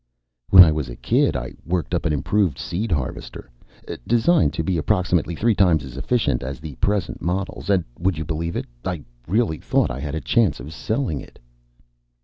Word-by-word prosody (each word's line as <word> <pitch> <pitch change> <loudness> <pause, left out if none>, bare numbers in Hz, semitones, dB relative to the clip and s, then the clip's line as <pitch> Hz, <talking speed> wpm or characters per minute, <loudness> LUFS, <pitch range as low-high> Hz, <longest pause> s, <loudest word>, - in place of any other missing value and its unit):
"When 95 -1 +11
I 80 - +4
was 75 -4 -2
a - - -7
kid, - - +1
I - - -4
worked 85 -3 -2
up - - 0
an - - 0
improved 85 +1 +1
seeder 95 +4 -2
harvester. 65 -2 -6 0.6
Designed 120 - +3
to 80 - -2
be 85 0 0
approximately 90 0 +1
three 115 +6 +2
times 90 -7 +3
as 65 - -10
efficient 125 -3 0
as 65 +1 -5
the 75 -2 -8
present 100 -4 -1
models. 95 +3 -3
And 95 -3 +3 0.2
would 90 -1 0
you 80 - -3
believe 80 +2 -3
it, - - -2 0.2
I 90 -5 -3 0.2
really 100 -4 +1
thought - - +1
I 65 - -5
had 75 +2 -4
a - - -1
chance 105 -1 +2
of 75 - -8
selling 110 - -2
it." - - -15
85 Hz, 190 wpm, -22 LUFS, 75-100 Hz, 0.6 s, When